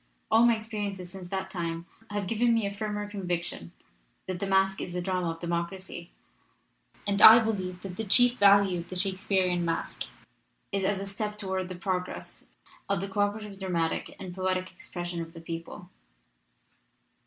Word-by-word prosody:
All 230 +2 +7
my 235 - +5
experiences 205 -4 -5
since 185 -2 -8
that 190 0 -3
time 170 -2 -3 0.2
have 205 -1 -2
given 230 +4 +2
me 225 -2 +1
a 200 - -2
firmer 210 0 -3
conviction 175 - -3 0.5
that 185 -1 -4
the 200 - -2
masque 195 0 +2
is 175 - -5
the 180 - -1
drama 180 -1 -1
of 165 0 -5
democracy, 170 +1 -4 1.0
and 200 -1 +1
I 220 +1 +12
believe 190 -6 -1
that 185 -2 -7
the 225 - -2
chief 245 +4 +5
value 200 -2 +6
of 170 +1 -8
the 185 - -6
Shakespearian 185 -1 +1
masque 165 -1 -2 0.7
is 195 -1 0
as 195 0 +1
a 195 - -4
step 210 +1 -4
forward 190 -2 -2
in 185 - -3
the 185 - -6
progress 180 0 -4 0.4
of 200 -2 +2
the 195 - -3
co 195 - -4
operative 205 -1 -2
dramatic 170 -4 -1
and 185 -2 -7
poetic 185 0 -1
expression 175 -1 -5
of 165 0 -8
the 165 - -9
people. 170 +3 -7
190 Hz, 175 wpm, -28 LUFS, 175-205 Hz, 1.0 s, I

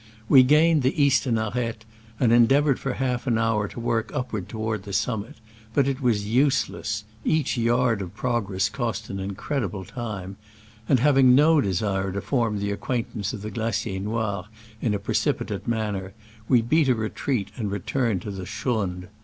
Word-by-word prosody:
We 135 +1 +8
gained 150 +4 +4
the 130 +5 0
eastern 135 -4 +3
arete, 110 0 -3 0.3
and 120 -3 +3
endeav 120 +5 +5
ored 140 -4 +2
for 135 - -2
half 125 -1 -2
an 115 -3 +2
hour 115 -2 +1
to 120 - -9
work 115 -1 -1
upward 125 -9 -3
toward 110 -2 -3
the 100 0 -8
summit, 105 +2 -2 0.4
but 140 -1 +3
it 135 0 -2
was 110 -5 +1
useless 110 -3 0 0.2
(each 155 -2 +1
yard 120 -2 +2
of 95 0 -7
progress 100 -6 0
cost 115 -5 -3
an 100 - -4
incredi 100 +5 -3
ble 95 0 -7
time); 100 -6 -6 0.5
and 130 - +5
having 135 -1 +5
no 150 +2 +5
desire 95 0 -1
to 100 - -3
form 115 -6 0
the 100 0 -2
acquaintance 110 -2 -3
of 105 - -7
the 110 - -5
Glacier 110 -2 -2
Noir 105 -2 -2 0.4
in 110 -4 +1
a - - +1
precipitate 100 0 -1
manner, 105 -5 -2 0.4
we 120 -3 +5
beat 150 +4 +3
a 125 - +4
retreat 110 0 -2
and 110 -5 -3
returned 100 0 -1
to 105 - -5
the 95 -2 -6
schrund. 95 -7 -2
115 Hz, 175 wpm, -25 LUFS, 100-125 Hz, 0.5 s, We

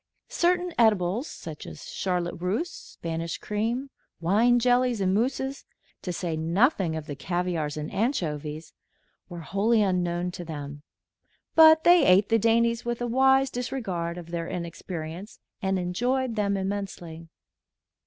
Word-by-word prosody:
Certain 355 0 +1
edibles, 215 - +2
such 155 -3 -9
as 80 -2 -10
charlotte 180 -2 -1
russe, 215 - -1
Spanish 165 0 -5
cream, 230 +6 -2 0.3
wine 215 +8 +3
jellies 245 -1 +2
and 190 -1 +1
mousses, 265 +5 -1 0.4
to 180 - -4
say 170 -2 -3
nothing 170 - +1
of 160 -1 -5
the 145 - -6
caviars 170 -1 -2
and 150 0 -5
anchovies, 155 - -2 0.6
were 175 -2 -7
wholly 210 +6 +2
unknown 180 -2 0
to 175 - -7
them; 145 -3 -7 0.7
but 315 0 +7
they 350 0 +6
ate 190 +3 +5
the 225 - +4
dainties 230 +1 +2
with 240 0 -3
a 245 - -2
wise 265 +2 +3
disregard 190 -9 -3
of 170 -1 -9
their 170 -1 -3
inexperience 170 +2 -6 0.2
and 190 -1 0
enjoyed 240 +8 -1
them 200 -2 0
immensely. 190 -4 -5
190 Hz, 135 wpm, -26 LUFS, 170-240 Hz, 0.7 s, but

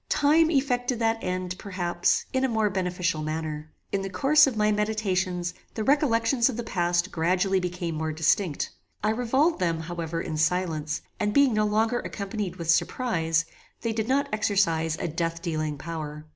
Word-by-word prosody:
Time 310 +3 +4
effected 255 -4 +1
that 225 0 0
end, 185 0 -2
perhaps, 175 -3 0
in 260 0 +1
a - - +4
more 220 -3 +1
beneficial 180 -3 -1
manner. 155 0 -4 0.2
In 195 - 0
the 195 - -4
course 290 +7 +5
of 250 -5 -2
my 210 0 +3
meditations 190 -4 -1 0.2
the 220 - -2
recollections 245 -3 +3
of 245 - -4
the 240 - -3
past 175 -2 0
gradually 180 +3 +1
became 180 -2 -3
more 160 0 -2
distinct. 160 +1 +1 0.3
I 215 - +3
revolved 260 +8 +1
them, 165 -2 0
however, 165 0 -4
in 160 -2 -4
silence, 155 -1 0 0.2
and 210 0 0
being 280 -4 +5
no 215 0 +2
longer 220 +3 +1
accompanied 200 -2 -4
with 170 -2 0
surprize, 165 -7 +1 0.4
they 230 -1 -1
did 220 0 -2
not 275 +2 +2
exercise 170 -7 +1
a - - -2
death 165 +1 -2
dealing 155 -3 -2
power. 150 -1 -6
185 Hz, 170 wpm, -26 LUFS, 165-225 Hz, 0.4 s, course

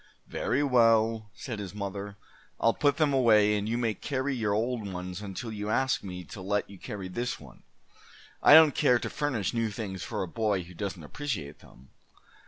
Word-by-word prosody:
"Very 145 - -1
well," 115 -4 +3
said 120 -5 -6
his 100 -1 -7
mother. 100 0 -5 0.4
"I'll 115 - +3
put 145 +1 +2
them 155 -3 +2
away, 110 -5 +5
and 105 +1 -2
you 115 - 0
may 115 -3 0
carry 135 +3 -2
your 110 -4 -1
old 110 -2 -2
ones 90 +1 -6
until 105 +3 -6
you 105 -1 -4
ask 130 +4 +1
me 90 -2 -7
to 95 - -10
let 100 +2 -1
you 100 -2 -13
carry 100 -3 -6
this 120 +7 -3
one. - - -15 0.8
I 145 - +9
don't 160 -3 +8
care 135 -5 +4
to - - -5
furnish 130 -10 -1
new 115 -1 0
things 100 -4 -5
for 85 - -3
a - - -4
boy 105 -2 0
who 90 +1 -13
doesn't 95 -2 -5
appreciate 80 - -5
them." 65 +2 -18
105 Hz, 190 wpm, -28 LUFS, 100-120 Hz, 0.8 s, I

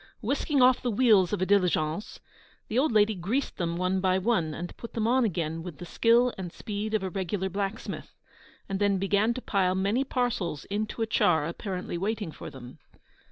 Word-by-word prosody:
Whisking 275 +3 +1
off 255 0 +5
the 245 - -1
wheels 215 -5 +4
of 205 -3 0
a - - +2
diligence, 180 -2 +1 0.5
the 230 - +1
old 295 +1 +2
lady 215 0 +4
greased 210 +9 -2
them 170 -1 -1
one 185 +1 0
by 185 0 +2
one, 190 -6 +1
and 175 +3 -6
put 235 - -9
them 220 -2 -1
on 255 +3 +3
again 165 -5 -2
with 170 -3 -8
the 175 - -8
skill 235 +7 +3
and 180 -3 -5
speed 215 +3 -4
of 210 - 0
a 190 - -3
regular 190 0 -2
blacksmith, 200 +3 -4 0.5
and 195 -1 -2
then 200 -1 +2
began 200 +4 +1
to 255 - -6
pile 185 -2 +1
many 200 +7 +1
parcels 240 - -2
into 215 +2 -2
a - - +1
char 165 -8 +2
apparently 180 +1 -4
waiting 205 -2 -2
for - - -9
them. 125 -2 -11
200 Hz, 195 wpm, -28 LUFS, 180-225 Hz, 0.5 s, off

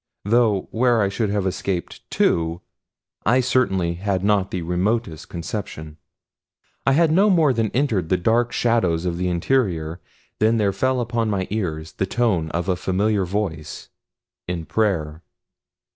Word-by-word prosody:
Though 110 -3 +2
where 120 0 +2
I 100 - +1
should 105 +1 -1
have 100 -1 -1
escaped 95 -1 -3
to 85 +1 +1 0.6
I 125 +5 +3
certainly 95 -9 +1
had 95 +1 -2
not 100 -2 +2
the 90 -2 -3
remotest 90 0 -1
conception. 80 -3 -6 0.9
I 135 - +5
had 160 +2 +4
no 195 +6 +4
more 160 -8 +4
than 115 -2 0
entered 110 - 0
the 95 - +3
dark 115 +6 +1
shadows 90 -10 +1
of 85 -1 -1
the 90 - 0
interior 85 -4 0 0.4
than 110 +2 +3
there 100 -3 +1
fell 130 +2 +1
upon 115 -1 -1
my 95 -3 -1
ears 80 -7 -3
the 95 - -2
tones 100 -10 0
of 85 +1 -2
a 95 - +2
familiar 95 +2 0
voice, 90 -5 -4 0.6
in 85 -2 -3
prayer. 80 -8 -1
100 Hz, 150 wpm, -22 LUFS, 85-115 Hz, 0.9 s, I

